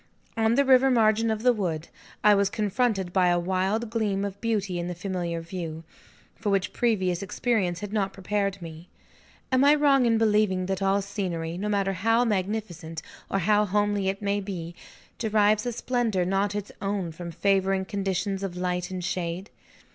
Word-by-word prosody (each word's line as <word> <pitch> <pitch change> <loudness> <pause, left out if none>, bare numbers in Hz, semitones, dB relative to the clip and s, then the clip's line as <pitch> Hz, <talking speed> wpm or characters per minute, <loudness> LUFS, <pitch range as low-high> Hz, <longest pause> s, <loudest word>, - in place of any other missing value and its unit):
On 225 +1 +2
the 280 +1 +3
river 265 0 +6
margin 225 -2 +3
of 220 0 -2
the 250 -1 +5
wood, 170 -7 -3 0.4
I 210 - +7
was 200 -1 +3
confronted 205 -3 0
by 185 -2 +4
a 175 0 +3
wild 190 +6 -1
gleam 205 -4 0
of 200 0 -6
beauty 205 -6 -1
in 175 - -3
the 180 - -4
familiar 175 -2 -3
view, 165 -2 -6 0.5
for 210 - -3
which 195 -2 0
previous 190 -7 +1
experience 195 -4 -1
had 205 0 -6
not 195 -3 0
prepared 195 -1 -2
me. 165 +1 -10 0.6
Am 260 +1 +4
I 290 +1 +6
wrong 275 -4 +4
in 230 -1 +3
believing 210 -4 +2
that 190 0 -2
all 195 +1 +2
scenery, 175 -5 -3
no 205 +4 -3
matter 200 -1 +1
how 225 +6 +2
magnificent 185 -6 -3 0.3
or - - 0
how 210 +3 +3
homely 205 0 0
it 195 +2 -4
may 200 0 +1
be, 180 -4 -6 0.5
derives 215 -1 +2
a - - 0
splendor 235 -6 0
not 195 +2 0
its 205 -1 -4
own 195 -4 -2
from 170 +2 -7
favouring 195 +2 +1
conditions 195 0 -2
of 185 -3 -4
light 180 0 -2
and 185 -1 -5
shade? 175 +2 -3
195 Hz, 175 wpm, -26 LUFS, 180-215 Hz, 0.6 s, I